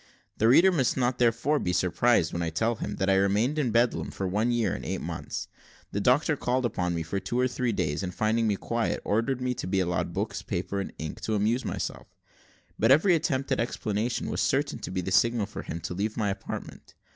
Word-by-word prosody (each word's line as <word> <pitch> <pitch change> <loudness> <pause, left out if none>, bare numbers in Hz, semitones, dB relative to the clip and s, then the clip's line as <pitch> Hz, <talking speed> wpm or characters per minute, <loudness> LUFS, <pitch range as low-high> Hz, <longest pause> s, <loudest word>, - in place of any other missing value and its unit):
The 110 - +3
reader 170 +10 +7
must 140 -8 +1
not 125 -1 0
therefore 120 +5 +2
be 90 - -1
surprised 90 +1 +2
when 85 - -2
I 85 - 0
tell 110 +8 0
him, - - -4
that 95 - -1
I 95 - +4
remained 105 +9 +2
in 135 -5 +1
Bedlam 115 +2 +1
for 95 - -3
one 105 +6 +1
year 115 -5 +1
and 65 - -5
eight - - -3
months. - - -5 0.4
The 100 - -1
doctor 145 +8 +3
called 130 -1 0
upon 90 -6 -1
me 85 - -2
for 90 +5 -3
two 100 +6 -2
or 130 - +3
three 125 -1 -1
days, 75 -7 -1
and 90 -2 -3
finding 110 +3 +1
me 105 - +2
quiet, 115 +3 -1
ordered 120 +5 0
me 125 0 0
to 120 - -5
be 95 +1 +1
allowed 90 -1 -1
books, 100 +4 -3
paper, 95 +2 -3
and 100 - -4
ink, 80 0 -6
to 110 - -1
amuse 110 +5 +1
myself; - - -4 0.7
but 115 - +3
every 160 +8 +6
attempt 140 -5 0
at - - +2
explanation 115 0 -1
was - - -1
certain - - 0
to - - -6
be 90 0 -2
the 95 - -4
signal 115 +1 +3
for 105 - -7
him 85 - -5
to - - -4
leave 105 +4 -2
my 105 -3 +1
apartment. 95 0 -7
110 Hz, 225 wpm, -27 LUFS, 95-125 Hz, 0.7 s, reader